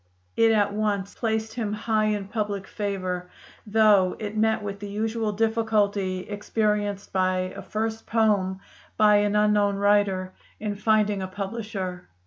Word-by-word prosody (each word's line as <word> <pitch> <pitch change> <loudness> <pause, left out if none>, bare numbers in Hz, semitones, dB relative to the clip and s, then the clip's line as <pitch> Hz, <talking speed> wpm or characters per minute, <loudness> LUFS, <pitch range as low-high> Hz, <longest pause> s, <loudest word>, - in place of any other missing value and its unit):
It 225 0 +4
at 205 -2 +2
once 205 -2 -1
placed 220 -1 -2
him 220 -3 -2
high 215 0 0
in 205 -2 -1
public 205 -2 -3
favor, 185 -4 -3 0.4
though 210 -3 +4
it 210 -1 -5
met 220 0 +1
with 200 -1 -5
the 205 0 -6
usual 220 +1 -1
difficulty 210 -3 +1
experienced 205 0 -2
by 185 -1 0
a - - -6
first 220 +1 -3
poem 200 -4 +1 0.4
by 210 -1 +6
an 205 0 +1
unknown 210 -1 +3
writer, 200 -2 +2 0.3
in 210 -1 -2
finding 210 -1 +1
a 190 - -3
publisher. 195 -2 -5
205 Hz, 140 wpm, -25 LUFS, 195-215 Hz, 0.4 s, by